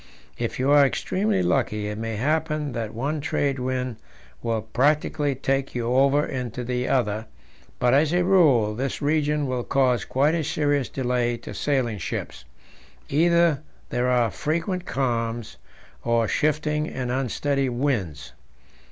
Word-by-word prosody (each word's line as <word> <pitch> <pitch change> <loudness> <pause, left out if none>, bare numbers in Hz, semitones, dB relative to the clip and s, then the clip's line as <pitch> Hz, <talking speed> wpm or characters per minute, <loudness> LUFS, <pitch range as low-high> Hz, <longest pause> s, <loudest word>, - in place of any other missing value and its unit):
If - - -2
you 130 +2 +1
are 145 -1 +7
extremely 190 +7 0
lucky, 105 -10 0
it 105 - -4
may 115 0 -3
happen 155 +4 0
that 115 -3 -4
one 145 +7 -2
trade 140 -1 0
wind 125 -2 -2 0.4
will 115 -2 -1
practically 145 +4 +1
take 135 0 -1
you 120 0 -1
over 140 +3 +4
into 125 -2 -4
the 125 +1 -2
other; 110 -4 0 0.5
but, 125 0 +2
as 150 +2 +4
a 180 +1 +2
rule, 150 - +4
this 130 +5 -3
region 150 0 +1
will 130 -2 -2
cause 125 -5 +2
quite 145 +4 +1
a 165 -1 0
serious 145 -2 0
delay 125 -2 0
to 120 - -9
sailing 125 -7 0
ships; - - -5 0.6
either 170 0 +3 0.3
there 125 +1 +1
are 120 -3 +2
frequent 170 +4 -2
calms, 120 -3 -2 0.5
or 115 -1 +2
shifting 150 +3 0
and 125 -2 -3
unsteady 135 +2 0
winds. 115 - -2
135 Hz, 145 wpm, -24 LUFS, 120-150 Hz, 0.6 s, are